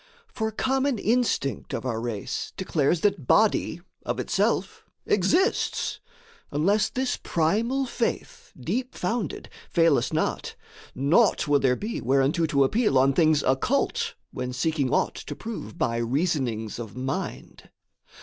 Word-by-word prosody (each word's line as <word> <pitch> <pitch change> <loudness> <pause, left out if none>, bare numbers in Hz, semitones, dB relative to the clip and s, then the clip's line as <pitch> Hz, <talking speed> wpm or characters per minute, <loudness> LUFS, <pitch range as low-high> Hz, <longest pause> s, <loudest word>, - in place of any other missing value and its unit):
For 220 -1 -2
common 265 +3 0
instinct 215 - 0
of 120 - -5
our 115 -3 -2
race 115 -4 -4
declares 165 -3 +1
That 180 -11 0
body 205 -5 +3 0.2
of - - -3
itself - - 0 0.2
exists: 325 - +1 0.5
unless 195 +8 +2
This 260 0 -2
primal 225 +12 +1
faith, 240 -2 -3
deep 240 - -3
founded, 225 +3 -3 0.2
fail 165 -4 +4
us - - -3
not, - - -1 0.4
Naught 155 - +3
will 145 -1 +4
there 130 -2 +3
be 215 - -4
whereunto 135 +6 +2
to 140 -2 +3
appeal 210 - +2
On 135 +1 +4
things 155 0 +3
occult 130 0 0 0.2
when 125 0 -4
seeking 140 +1 0
aught - - +1
to - - -7
prove 225 -6 -7
By 115 -8 0
reasonings 120 - -1
of 115 -2 -7
mind. 130 +1 -5
160 Hz, 130 wpm, -26 LUFS, 130-220 Hz, 0.5 s, fail